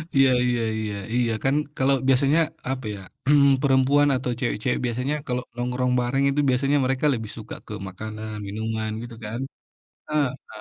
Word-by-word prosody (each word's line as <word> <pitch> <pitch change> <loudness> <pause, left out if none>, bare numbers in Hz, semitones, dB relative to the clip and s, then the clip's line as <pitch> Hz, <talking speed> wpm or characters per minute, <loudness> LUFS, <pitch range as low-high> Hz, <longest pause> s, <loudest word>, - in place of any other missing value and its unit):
Iya 135 -1 +6 0.2
iya 120 -1 +1 0.2
iya 105 -2 -3 0.2
iya, 120 -2 +2
kan 135 +2 +3 0.2
kalau 135 +1 +3
biasanya 135 +4 +4 0.3
apa 130 -2 -4
ya, - - -9 0.3
mmm, 140 -1 +6
perempuan 140 +1 +4
atau 125 -1 -2
cewek-cewek 125 0 0
biasanya 125 +5 -1
kalau 125 0 -1
nongkrong 125 +1 -1
bareng 135 +3 +1
itu 140 +1 0
biasanya 140 +3 +2
mereka 135 +3 0
lebih 110 -3 -4
suka 110 0 -7
ke 105 - -6
makanan, 110 +3 -6
minuman 110 +1 -3
gitu, 120 -1 -8
kan? 110 +4 -4 0.7
Heeh. 140 -3 -1
125 Hz, 160 wpm, -24 LUFS, 110-135 Hz, 0.7 s, Iya